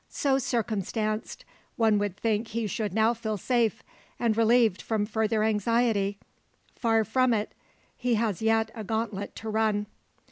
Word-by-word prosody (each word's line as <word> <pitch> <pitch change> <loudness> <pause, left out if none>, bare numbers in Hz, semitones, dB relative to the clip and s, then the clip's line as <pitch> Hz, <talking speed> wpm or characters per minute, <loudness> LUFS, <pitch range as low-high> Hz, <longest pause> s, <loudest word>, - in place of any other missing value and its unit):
So 270 -2 +1
circumstanced, 215 -2 -2 0.3
one 220 -3 +3
would 205 -2 -2
think 220 0 0
he 225 +1 -2
should 210 0 -2
now 220 +4 +3
feel 220 -2 -3
safe, 235 +2 0 0.4
and 230 -2 +1
relieved 230 -3 +3
from 215 -2 -1
further 220 0 0
anxiety. 215 -1 +1 0.6
Far 225 -2 +2
from 250 +2 +2
it: 210 0 -3 0.4
he 245 -1 0
has 215 -3 -1
yet 225 0 +2
a 220 - -6
gauntlet 220 -2 -3
to 220 - -6
run. 215 -1 +1
220 Hz, 145 wpm, -27 LUFS, 210-230 Hz, 0.6 s, one